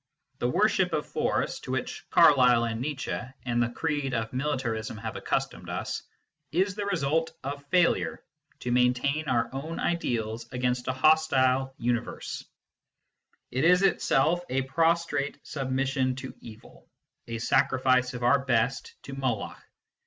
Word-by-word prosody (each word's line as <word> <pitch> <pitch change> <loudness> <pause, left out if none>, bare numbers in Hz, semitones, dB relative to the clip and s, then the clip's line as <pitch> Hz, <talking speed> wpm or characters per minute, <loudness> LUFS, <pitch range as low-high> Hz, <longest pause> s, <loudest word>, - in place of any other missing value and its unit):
The - - +1
worship - - +2
of - - 0
Force, - - -1
to - - -7
which - - -4
Carlyle 125 -4 +6
and 115 0 -2
Nietzsche 140 0 -3 0.3
and 120 -1 +1
the 120 - +1
creed 145 0 -2
of 115 0 -3
Militarism 125 -6 -2
have 110 0 -5
accustomed - - -2
us, - - -3 0.5
is 185 +4 +1
the 205 +1 -4
result 160 -3 0
of 140 +1 -5
failure 175 +2 +2 0.4
to 125 - -2
maintain 125 +5 +2
our 120 -3 +1
own 155 +5 -5
ideals 115 -9 -1
against 125 -1 -1
a - - +2
hostile 130 -2 +3
universe: 120 0 -3 1.1
it 130 +3 0
is 180 +3 +5
itself 175 -3 +2
a 135 +1 0
prostrate 165 0 +1
submission 130 -2 -1
to 130 0 -7
evil, 110 -1 -14 0.4
a 115 0 -4
sacrifice 130 +1 +2
of 120 - -5
our 135 +3 +4
best 125 -1 0
to 135 - -8
Moloch. 130 -6 -3
130 Hz, 140 wpm, -28 LUFS, 125-150 Hz, 1.1 s, Carlyle